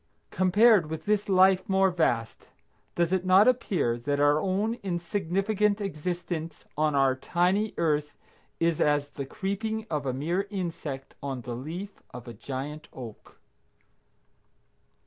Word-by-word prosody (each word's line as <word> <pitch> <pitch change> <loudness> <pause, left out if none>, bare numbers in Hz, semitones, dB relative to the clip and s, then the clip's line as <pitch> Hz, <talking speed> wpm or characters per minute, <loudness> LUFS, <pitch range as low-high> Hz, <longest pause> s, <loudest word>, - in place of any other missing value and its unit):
Compared 190 -1 +4
with 160 0 -5
this 210 -1 +1
life 190 0 +4
more 190 0 +3
vast, 120 -10 -1 0.5
does 170 +1 +1
it 185 -1 +1
not 190 +4 +6
appear 185 - +1
that 145 +4 -1
our 145 +1 +4
own 200 +5 0
insignificant 195 +3 0
existence 175 -3 -4
on 150 -1 +1
our 135 -1 +3
tiny 180 +9 0
Earth 150 -3 0 0.4
is 165 -1 +1
as 145 -1 +2
the 140 -1 -6
creeping 220 +6 -3
of 145 -3 -2
a - - +1
mere 170 +9 -1
insect 165 -8 -5
on 135 -3 -4
the 120 0 -5
leaf 170 +11 -7
of 125 0 -9
a 120 - -7
giant 135 +7 -6
oak? 115 -5 -11
170 Hz, 135 wpm, -27 LUFS, 145-195 Hz, 0.5 s, not